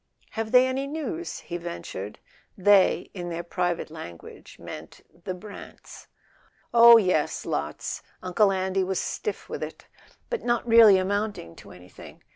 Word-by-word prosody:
"Have 220 Hz, 0 st, -4 dB
they 250 Hz, 0 st, +7 dB
any 265 Hz, +1 st, -2 dB
news—?" 320 Hz, +3 st, -5 dB
he 175 Hz, -, -5 dB
ventured. 170 Hz, -, -7 dB, 0.4 s
"They," 200 Hz, 0 st, +4 dB
in 175 Hz, -2 st, -6 dB
their 170 Hz, 0 st, -4 dB
private 175 Hz, -2 st, -2 dB
language, 85 Hz, -, -11 dB
meant -, -, -10 dB, 0.2 s
the 185 Hz, -, -3 dB
Brants. 200 Hz, +3 st, -12 dB, 0.7 s
"Oh, 235 Hz, 0 st, +9 dB
yes, 185 Hz, -8 st, 0 dB
lots: 75 Hz, +1 st, -4 dB, 0.2 s
Uncle 195 Hz, +3 st, +3 dB
Andy 190 Hz, 0 st, 0 dB
was 190 Hz, 0 st, -1 dB
stiff 430 Hz, -, -4 dB
with -, -, -6 dB
it. -, -, -7 dB, 0.5 s
But 475 Hz, -, -2 dB
not 240 Hz, 0 st, 0 dB
really 225 Hz, -4 st, +8 dB
amounting 200 Hz, -, -2 dB
to -, -, -13 dB
anything. 90 Hz, 0 st, -14 dB
190 Hz, 140 wpm, -26 LUFS, 175-230 Hz, 0.7 s, Oh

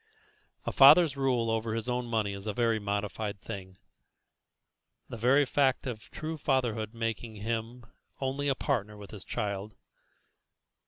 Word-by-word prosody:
A -, -, -1 dB
father's 145 Hz, +2 st, +7 dB
rule 125 Hz, -4 st, +1 dB
over 110 Hz, 0 st, -1 dB
his 115 Hz, 0 st, -3 dB
own 125 Hz, 0 st, -1 dB
money 110 Hz, -3 st, 0 dB
is 100 Hz, +2 st, -8 dB
a 105 Hz, -, -2 dB
very 115 Hz, -2 st, +2 dB
modified 100 Hz, 0 st, -3 dB
thing, 95 Hz, -1 st, -8 dB, 1.3 s
the -, -, -6 dB
very 130 Hz, +6 st, +4 dB
fact 135 Hz, 0 st, +1 dB
of 110 Hz, -5 st, -6 dB
true 160 Hz, +1 st, -5 dB
fatherhood 120 Hz, -6 st, 0 dB
making 115 Hz, -1 st, -3 dB
him 115 Hz, +3 st, -4 dB, 0.3 s
only 135 Hz, +1 st, -2 dB
a 135 Hz, -, +2 dB
partner 105 Hz, -7 st, -2 dB
with 100 Hz, -1 st, -11 dB
his 105 Hz, -3 st, -9 dB
child. 100 Hz, 0 st, -4 dB
115 Hz, 145 wpm, -30 LUFS, 105-130 Hz, 1.3 s, father's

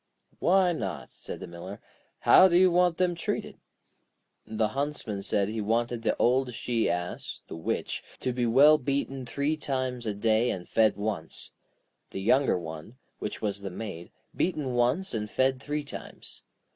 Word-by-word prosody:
'Why 185 Hz, 0 st, +4 dB
not?' 90 Hz, -, -4 dB
said -, -, -8 dB
the -, -, -5 dB
Miller. 85 Hz, +4 st, -9 dB, 0.4 s
'How 185 Hz, -, +8 dB
do 175 Hz, -1 st, +3 dB
you 185 Hz, 0 st, +6 dB
want 175 Hz, -1 st, +3 dB
them 180 Hz, -1 st, +2 dB
treated?' 170 Hz, -, -4 dB, 0.9 s
The 110 Hz, -1 st, 0 dB
Huntsman 135 Hz, -7 st, -3 dB
said 100 Hz, 0 st, +1 dB
he 110 Hz, +1 st, -3 dB
wanted 115 Hz, +2 st, 0 dB
the 115 Hz, -, 0 dB
old 125 Hz, 0 st, +2 dB
she 115 Hz, -1 st, 0 dB
ass 90 Hz, 0 st, -4 dB
(the -, -, -8 dB
Witch) 80 Hz, -, -3 dB, 0.2 s
to 125 Hz, -, -1 dB
be 120 Hz, -1 st, 0 dB
well 145 Hz, +6 st, +6 dB
beaten 135 Hz, -1 st, -2 dB
three 140 Hz, +6 st, 0 dB
times 130 Hz, -5 st, -3 dB
a 105 Hz, -, -1 dB
day 110 Hz, +3 st, +2 dB
and 90 Hz, -2 st, -4 dB
fed 110 Hz, -2 st, +3 dB
once. 100 Hz, -6 st, -4 dB, 0.6 s
The -, -, -5 dB
younger 125 Hz, +4 st, +3 dB
one, 80 Hz, +6 st, -8 dB, 0.2 s
which 105 Hz, -, -5 dB
was 100 Hz, -1 st, -1 dB
the 100 Hz, -, -4 dB
Maid, 90 Hz, -3 st, -7 dB, 0.2 s
beaten 150 Hz, -8 st, -1 dB
once 125 Hz, +10 st, +1 dB
and 105 Hz, -2 st, -2 dB
fed 130 Hz, +2 st, +1 dB
three 150 Hz, +1 st, -3 dB
times. 145 Hz, -, -9 dB
120 Hz, 165 wpm, -28 LUFS, 105-140 Hz, 0.9 s, How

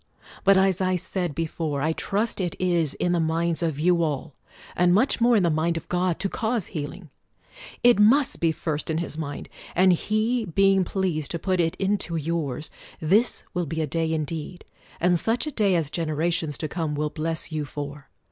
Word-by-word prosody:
But, 195 Hz, 0 st, +6 dB
as 190 Hz, -1 st, +3 dB
I 185 Hz, 0 st, +2 dB
said 180 Hz, -3 st, -2 dB
before, 160 Hz, -3 st, -2 dB
I 160 Hz, +1 st, +1 dB
trust 205 Hz, +4 st, -1 dB
it 175 Hz, -3 st, -2 dB
is 170 Hz, -5 st, +1 dB
in 175 Hz, -, 0 dB
the 175 Hz, -, +2 dB
minds 165 Hz, +1 st, 0 dB
of 160 Hz, -4 st, -1 dB
you 170 Hz, +2 st, +3 dB
all, 150 Hz, -2 st, -2 dB, 0.4 s
and 180 Hz, 0 st, +4 dB
much 240 Hz, +3 st, +2 dB
more 240 Hz, 0 st, +5 dB
in 205 Hz, -, +3 dB
the 170 Hz, -, +2 dB
mind 165 Hz, +2 st, 0 dB
of -, -, -7 dB
God, 180 Hz, -1 st, 0 dB
to 195 Hz, -, +2 dB
cause 220 Hz, 0 st, -1 dB
healing. 155 Hz, +1 st, -6 dB, 0.7 s
It 240 Hz, -3 st, +6 dB
must 250 Hz, +7 st, +4 dB
be 165 Hz, -1 st, +2 dB
first 155 Hz, -1 st, -3 dB
in 160 Hz, -, 0 dB
His 170 Hz, -2 st, -3 dB
mind: 150 Hz, -3 st, -5 dB, 0.3 s
and 185 Hz, +1 st, +5 dB
He 215 Hz, +6 st, 0 dB
being 195 Hz, +1 st, +3 dB
pleased 175 Hz, -5 st, -2 dB
to 170 Hz, -, -2 dB
put 185 Hz, +1 st, -1 dB
it 165 Hz, -1 st, +1 dB
into 195 Hz, -3 st, -1 dB
yours, 155 Hz, -2 st, -2 dB, 0.3 s
this 200 Hz, +10 st, +2 dB
will 175 Hz, -2 st, -1 dB
be 160 Hz, +3 st, -3 dB
a 160 Hz, -, +1 dB
day 160 Hz, +2 st, -1 dB
indeed, 160 Hz, +2 st, -4 dB, 0.3 s
and 175 Hz, 0 st, +3 dB
such 225 Hz, -, 0 dB
a 305 Hz, -, -3 dB
day 205 Hz, -7 st, +2 dB
as 160 Hz, -4 st, 0 dB
generations 160 Hz, -1 st, -1 dB
to 155 Hz, -, -3 dB
come 160 Hz, -3 st, -3 dB
will 150 Hz, 0 st, -1 dB
bless 165 Hz, +1 st, -1 dB
you 155 Hz, -1 st, -2 dB
for 145 Hz, 0 st, -7 dB
170 Hz, 195 wpm, -25 LUFS, 155-190 Hz, 0.7 s, But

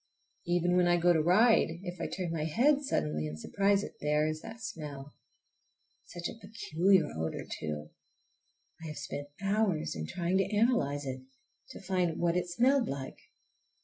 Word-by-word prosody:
Even 175 Hz, 0 st, +2 dB
when 180 Hz, -1 st, +4 dB
I 175 Hz, 0 st, +4 dB
go 175 Hz, +1 st, +4 dB
to 160 Hz, -, +3 dB
ride, 180 Hz, -1 st, +4 dB
if 175 Hz, -2 st, -6 dB
I -, -, -1 dB
turn 180 Hz, -3 st, -4 dB
my 155 Hz, -2 st, -2 dB
head 270 Hz, -, +3 dB
suddenly 75 Hz, -, -1 dB
and 75 Hz, +1 st, -7 dB
surprise 200 Hz, -, +1 dB
it—there 150 Hz, -3 st, 0 dB
is 155 Hz, 0 st, -2 dB
that 225 Hz, 0 st, -9 dB
smell! 150 Hz, -10 st, -7 dB, 0.9 s
Such 170 Hz, 0 st, -5 dB
a 225 Hz, -, -9 dB
peculiar 190 Hz, -4 st, +2 dB
odor, 80 Hz, 0 st, -3 dB
too! 75 Hz, -1 st, -5 dB, 0.9 s
I -, -, -5 dB
have 150 Hz, -, -7 dB
spent 145 Hz, 0 st, -5 dB, 0.2 s
hours 195 Hz, -, +1 dB
in 80 Hz, 0 st, -4 dB
trying 180 Hz, +1 st, 0 dB
to 195 Hz, +2 st, 0 dB
analyze 145 Hz, -, +2 dB
it, 130 Hz, -1 st, -4 dB, 0.5 s
to -, -, -10 dB
find 180 Hz, -3 st, 0 dB
what 170 Hz, 0 st, +1 dB
it 180 Hz, 0 st, -1 dB
smelled 250 Hz, +7 st, +3 dB
like. 135 Hz, -1 st, -5 dB
175 Hz, 165 wpm, -31 LUFS, 150-195 Hz, 0.9 s, when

